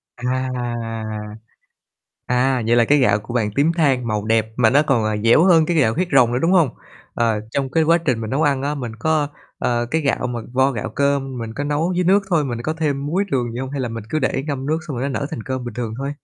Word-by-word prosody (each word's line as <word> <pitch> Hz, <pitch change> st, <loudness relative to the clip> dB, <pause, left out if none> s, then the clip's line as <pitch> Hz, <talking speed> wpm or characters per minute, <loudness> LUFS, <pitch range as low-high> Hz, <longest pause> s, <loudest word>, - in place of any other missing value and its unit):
À! 130 Hz, +1 st, -2 dB, 1.8 s
À, 125 Hz, +1 st, +1 dB
vậy 120 Hz, -, +4 dB
là 120 Hz, -1 st, +4 dB
cái 145 Hz, -, +4 dB
gạo 105 Hz, -7 st, +3 dB
của 105 Hz, +3 st, -9 dB
bạn 115 Hz, -4 st, +1 dB
tím 150 Hz, +4 st, +3 dB
than 135 Hz, -7 st, +1 dB
màu 105 Hz, -1 st, -2 dB
đẹp, 110 Hz, 0 st, +2 dB
mà 115 Hz, -3 st, +4 dB
nó 140 Hz, +5 st, +4 dB
còn, 120 Hz, -6 st, +2 dB
à, 110 Hz, -1 st, 0 dB
dẻo 115 Hz, +8 st, +5 dB
hơn 170 Hz, -4 st, +5 dB
cái 170 Hz, 0 st, 0 dB
gạo 115 Hz, -7 st, +3 dB
huyết 180 Hz, +6 st, -1 dB
rồng 120 Hz, -3 st, +5 dB
nữa, 125 Hz, -, +1 dB
đúng 165 Hz, -, +2 dB
hông? 175 Hz, -7 st, +4 dB, 0.4 s
Ờ, 115 Hz, -2 st, +1 dB
trong 135 Hz, 0 st, -1 dB
cái 160 Hz, -, +3 dB
quá 165 Hz, +2 st, +4 dB
trình 130 Hz, -9 st, -1 dB
mình 110 Hz, -, -4 dB
nấu 135 Hz, +6 st, 0 dB
ăn 140 Hz, -2 st, +2 dB
á, 145 Hz, +1 st, -1 dB
mình 125 Hz, -5 st, -5 dB
có, 155 Hz, -1 st, +1 dB, 0.3 s
ờ, 120 Hz, -1 st, 0 dB
cái 160 Hz, -, +1 dB
gạo 135 Hz, -3 st, 0 dB
mà 120 Hz, -1 st, -4 dB
vo 130 Hz, +1 st, +3 dB
gạo 110 Hz, -6 st, -4 dB
cơm 140 Hz, -2 st, -1 dB
mình 115 Hz, -1 st, -5 dB
có 145 Hz, -, -3 dB
nấu 150 Hz, +5 st, 0 dB
với 180 Hz, -, +1 dB
nước 195 Hz, +3 st, +4 dB
thôi, 160 Hz, -5 st, +2 dB
mình 120 Hz, -2 st, -4 dB
có 155 Hz, -, -1 dB
thêm 145 Hz, -4 st, -2 dB
muối, 180 Hz, +7 st, 0 dB
đường 120 Hz, -3 st, 0 dB
gì 120 Hz, -, -5 dB
hông? 130 Hz, -, -4 dB
Hay 140 Hz, -2 st, -3 dB
là 120 Hz, -, -2 dB
mình 115 Hz, -1 st, -6 dB
cứ 155 Hz, -, 0 dB
để 135 Hz, -1 st, -1 dB
ngâm 135 Hz, -3 st, -3 dB
nước 155 Hz, +3 st, 0 dB
xong 140 Hz, -6 st, -4 dB
rồi 135 Hz, +3 st, -2 dB
nó -, -, -2 dB
nở 140 Hz, -, -2 dB
thành 115 Hz, -, -5 dB
cơm 130 Hz, 0 st, -4 dB
bình 120 Hz, -, -6 dB
thường 120 Hz, -3 st, -4 dB
thôi? 140 Hz, +2 st, -3 dB
135 Hz, 265 wpm, -20 LUFS, 120-150 Hz, 1.8 s, dẻo